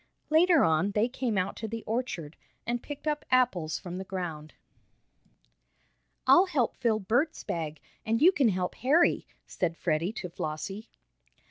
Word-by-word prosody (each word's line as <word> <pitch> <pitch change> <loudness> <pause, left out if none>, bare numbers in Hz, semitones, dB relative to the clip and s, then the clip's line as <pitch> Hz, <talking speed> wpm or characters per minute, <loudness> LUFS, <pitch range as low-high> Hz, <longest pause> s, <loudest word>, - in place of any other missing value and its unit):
Later 330 -1 +5
on 165 +5 +2
they 215 +3 +2
came 245 -4 -2
out 185 0 -1
to 220 - -4
the 225 +1 -5
orchard, 215 - -3 0.3
and 240 0 -2
picked 290 0 -8
up 300 -1 0
apples 190 -12 +2
from 180 -1 -7
the - - -4
ground. 170 -5 -6 1.7
"I'll 350 +9 +6
help 280 -10 0
fill 230 -4 +1
Bert's 245 - 0
bag, 155 -2 -4 0.2
and 225 0 0
you 345 +7 +7
can 275 -10 +3
help 180 -2 -1
Harry," 300 +7 +2 0.2
said 170 -2 -2
Freddie 170 +4 0
to 190 - -5
Flossie. 180 +6 -5
215 Hz, 150 wpm, -29 LUFS, 175-255 Hz, 1.7 s, you